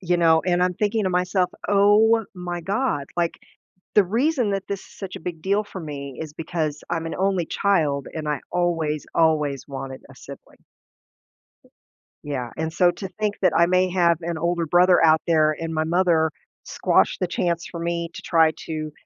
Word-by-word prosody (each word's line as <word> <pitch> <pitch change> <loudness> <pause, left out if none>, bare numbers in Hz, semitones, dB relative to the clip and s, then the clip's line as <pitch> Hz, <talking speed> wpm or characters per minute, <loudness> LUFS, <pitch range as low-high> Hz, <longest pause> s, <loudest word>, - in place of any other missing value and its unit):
You 180 -2 +1
know, 160 -1 +4
and 180 0 +2
I'm 180 0 +1
thinking 210 +1 0
to 185 - 0
myself, 180 0 +1 0.2
"Oh 210 +3 +4
my 175 -1 -5
god." 195 - -1
Like, 170 -1 +1 0.6
the 205 - +6
reason 245 - +1
that 195 -1 -2
this 200 -1 -3
is - - -17
such 195 -2 -6
a - - -8
big 165 -1 -6
deal 200 +2 +1
for 190 - -8
me 140 -4 -7
is 155 -2 -7
because 160 -2 -3
I'm 165 0 -2
an - - -4
only 190 -2 0
child 150 -9 0
and 155 -2 -5
I 150 -3 -1
always, 165 -4 -1
always 150 -4 +1
wanted 135 -1 -7
a - - -14
sibling. - - -13 1.6
Yeah, 130 -5 -4
and 160 0 -3
so 175 +2 +4
to 195 +2 -7
think 210 -1 -1
that 185 - +4
I 170 - +5
may 185 +1 +2
have 170 -3 +3
an 170 -1 -3
older 170 0 -1
brother 175 +3 +4
out 160 0 +5
there, 155 -2 +3
and 165 0 -4
my 155 0 0
mother 170 -2 +2 0.3
squash - - +1
the 180 - 0
chance 170 -1 -1
for 170 - -8
me 170 0 -2
to - - -8
try 160 -1 +3
to 155 -1 -4
170 Hz, 190 wpm, -23 LUFS, 160-185 Hz, 1.6 s, the